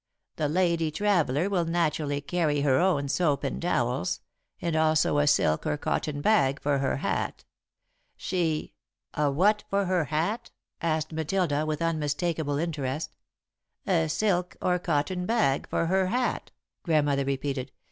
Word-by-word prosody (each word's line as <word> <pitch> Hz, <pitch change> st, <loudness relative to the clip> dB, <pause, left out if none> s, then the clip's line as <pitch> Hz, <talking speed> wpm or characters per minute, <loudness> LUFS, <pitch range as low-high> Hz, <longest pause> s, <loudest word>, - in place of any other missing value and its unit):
"'The 150 Hz, -2 st, 0 dB
lady 170 Hz, -1 st, +1 dB
traveller 165 Hz, -3 st, +1 dB
will 190 Hz, -4 st, +1 dB
naturally 155 Hz, -4 st, 0 dB
carry 150 Hz, -1 st, 0 dB
her 135 Hz, -2 st, +3 dB
own 175 Hz, -6 st, +2 dB
soap 145 Hz, 0 st, +1 dB
and 140 Hz, -, -3 dB
towels, 135 Hz, -1 st, 0 dB, 0.4 s
and 170 Hz, -2 st, -2 dB
also 155 Hz, -2 st, +3 dB
a 145 Hz, -, +2 dB
silk 80 Hz, -, +2 dB
or 150 Hz, -1 st, 0 dB
cotton 145 Hz, 0 st, -2 dB
bag 140 Hz, -9 st, +3 dB
for 140 Hz, -1 st, 0 dB
her 135 Hz, -1 st, 0 dB
hat. -, -, -2 dB, 0.7 s
She 165 Hz, -4 st, -1 dB, 0.2 s
'" -, -, -58 dB
"A 150 Hz, -1 st, +1 dB
what 205 Hz, +9 st, +2 dB
for 200 Hz, 0 st, +1 dB
her 180 Hz, -3 st, +1 dB
hat?" 165 Hz, -, -2 dB, 0.3 s
asked 155 Hz, -1 st, -1 dB
Matilda, 155 Hz, -1 st, 0 dB
with 155 Hz, +1 st, -1 dB
unmistakable 155 Hz, -1 st, -1 dB
interest. 150 Hz, -3 st, -3 dB, 0.7 s
"'A 165 Hz, -4 st, +2 dB
silk 180 Hz, 0 st, 0 dB
or 180 Hz, 0 st, +1 dB
cotton 180 Hz, +2 st, -1 dB
bag 220 Hz, -13 st, +1 dB
for -, -, 0 dB
her 190 Hz, +2 st, +2 dB
hat,'" 245 Hz, +5 st, -1 dB, 0.3 s
Grandmother 145 Hz, -4 st, +2 dB
repeated. 135 Hz, -1 st, -3 dB
155 Hz, 145 wpm, -27 LUFS, 145-180 Hz, 0.7 s, her